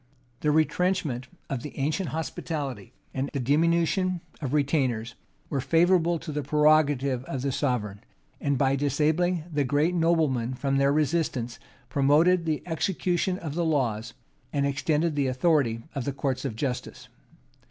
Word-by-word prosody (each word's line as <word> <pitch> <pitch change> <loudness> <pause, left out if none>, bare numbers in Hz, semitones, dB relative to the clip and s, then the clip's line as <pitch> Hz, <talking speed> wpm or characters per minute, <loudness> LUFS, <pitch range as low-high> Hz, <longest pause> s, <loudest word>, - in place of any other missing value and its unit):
The 150 - 0
retrenchment 155 -4 +1 0.2
of 135 -3 -3
the 150 - -8
ancient 155 +6 -1
hospitality, 145 - -4 0.2
and 135 +1 -2
the 140 - -1
diminution 170 +6 +2 0.2
of 135 -4 -3
retainers, 130 -6 0 0.3
were 140 -3 -1
favorable 170 +3 +3
to 160 0 -7
the 150 0 -2
prerogative 145 -3 +3
of 135 -2 -4
the 140 - 0
sovereign; 115 -8 -2 0.4
and, 140 -1 0
by 135 +1 +2
disabling 155 +5 +1
the 145 -1 +2
great 145 +6 +1
noblemen 155 -8 +1
from 135 +1 0
resistance, 140 -4 0 0.3
promoted 155 +7 +3
the 155 -2 -1
execution 180 +1 0
of 160 -6 -5
the 170 +2 0
laws, 125 -8 -1 0.4
and 140 -1 0
extended 150 +3 0
the 140 -2 +1
authority 130 -4 +1
of 135 -4 -3
the 140 - -2
courts 135 0 -2
of 125 -5 -3
justice. 125 +2 -4
145 Hz, 140 wpm, -27 LUFS, 130-165 Hz, 0.4 s, favorable